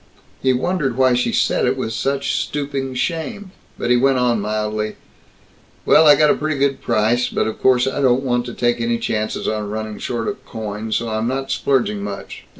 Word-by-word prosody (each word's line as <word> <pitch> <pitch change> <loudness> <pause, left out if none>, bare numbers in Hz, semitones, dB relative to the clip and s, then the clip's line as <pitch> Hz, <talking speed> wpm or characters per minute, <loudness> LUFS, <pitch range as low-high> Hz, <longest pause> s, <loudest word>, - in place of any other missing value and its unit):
He 130 - +3
wondered 135 -1 -1
why 130 -1 +4
she 125 0 +1
said - - +1
it - - 0
with 110 - -3
such 135 +4 -1
stooping 140 -2 -3
shame, 180 - -3 0.3
but 120 - -1
he 125 - +5
went 135 +1 +3
on 120 -3 +1
mildly, 105 0 -2 0.9
"Well, 155 0 +6
I 145 - +9
got 150 -1 +4
a - - +2
pretty 155 -1 -2
good 140 0 0
price, 120 +3 +1
but - - 0
of 110 - -5
course 125 -1 +4
I 135 +1 -2
don't 130 0 +3
want 120 -2 0
to 120 - -7
take 120 -1 +1
any 115 0 0
chances 110 -1 -2
on 105 -1 -2
running 110 0 -5
short 115 -2 -3
of - - -4
coin, 110 0 -6
so 115 +1 0
I'm 110 +1 -1
not 135 +1 -2
splurging 115 -7 0
much. 100 -1 -7
125 Hz, 200 wpm, -20 LUFS, 110-135 Hz, 0.9 s, I